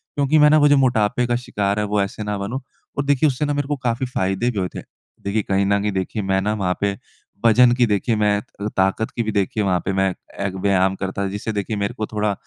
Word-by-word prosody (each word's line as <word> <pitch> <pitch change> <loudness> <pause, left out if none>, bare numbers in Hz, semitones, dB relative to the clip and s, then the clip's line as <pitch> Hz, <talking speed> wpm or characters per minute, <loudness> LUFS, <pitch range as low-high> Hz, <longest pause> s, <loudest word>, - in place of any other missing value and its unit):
क्योंकि 145 +2 +2
मैं 150 0 +7
ना 155 - +6
वो 145 -1 +5
जो 145 0 +5
मोटापे 125 -3 +2
का 120 - +1
शिकार 100 0 0
है, 105 - 0
वो 105 0 0
ऐसे 100 +2 -3
ना 105 -1 -2
बनूँ 105 +7 -4 0.4
और 140 - 0
देखिए, 145 +1 +3
उससे 140 +1 0
ना 145 - -1
मेरे 145 -1 -2
को 145 - 0
काफ़ी 120 +3 0
फ़ायदे 95 -1 -1
भी 105 - -3
हुए 90 - 0
थे। - - -4 0.4
देखिए, 100 +2 0
कहीं 95 0 +1
न 100 +1 +2
कहीं, 105 +1 0
देखिए, 95 +3 -2
मैं 95 -1 +1
ना 105 +2 0
वहाँ 95 -4 -1
पे 100 -1 0 0.5
वज़न 120 +2 +6
की 125 -1 +4
देखिए 110 +2 0
मैं 105 -1 +2
त - - -22 0.2
अ, 105 - -1
ताकत 95 +4 +1
की 120 - 0
भी 110 - -2
देखिए 100 +1 0
वहाँ 90 -2 +1
पे 95 - 0
मैं 95 0 +2 0.4
एक 95 - -2
व्यायाम 95 -1 +2
करता 95 0 -4
था, - - 0
जिससे 105 +3 -4
देखिए, 105 +1 -2
मेरे 100 0 -2
को 110 - -3
थोड़ा 105 -1 -1
105 Hz, 265 wpm, -21 LUFS, 100-120 Hz, 0.5 s, मैं